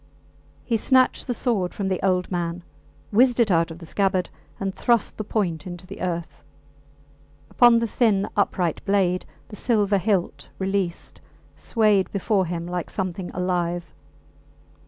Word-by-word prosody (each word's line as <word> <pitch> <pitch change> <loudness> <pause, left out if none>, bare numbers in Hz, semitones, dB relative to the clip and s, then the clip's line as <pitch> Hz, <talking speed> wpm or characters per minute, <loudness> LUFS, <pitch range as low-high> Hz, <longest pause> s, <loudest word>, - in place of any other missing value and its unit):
He 230 - +1
snatched 255 +3 +2
the 245 - 0
sword 205 -9 -1
from 200 - -2
the 185 -1 -2
old 185 -1 +1
man, 175 -1 -2 0.5
whizzed 245 +3 +4
it 225 -4 +4
out 165 -1 +3
of 165 - -8
the 170 - -11
scabbard, 190 +1 0 0.3
and 195 -1 -2
thrust 235 +1 +1
the 215 - -3
point 185 -7 -2
into 175 0 -8
the - - -10
earth. 170 -5 -4 1.1
Upon 240 -1 +6
the 230 - +1
thin, 210 -3 +2
upright 180 -5 0
blade 190 -2 +1 0.2
the 210 - -8
silver 210 -4 +1
hilt, 180 -8 -1
released, 190 -2 -3 0.3
swayed 210 -4 +2
before 200 -1 +1
him 170 0 -4
like 175 0 -4
something 185 -2 -4
alive. 175 -1 -2
190 Hz, 145 wpm, -24 LUFS, 175-210 Hz, 1.1 s, Upon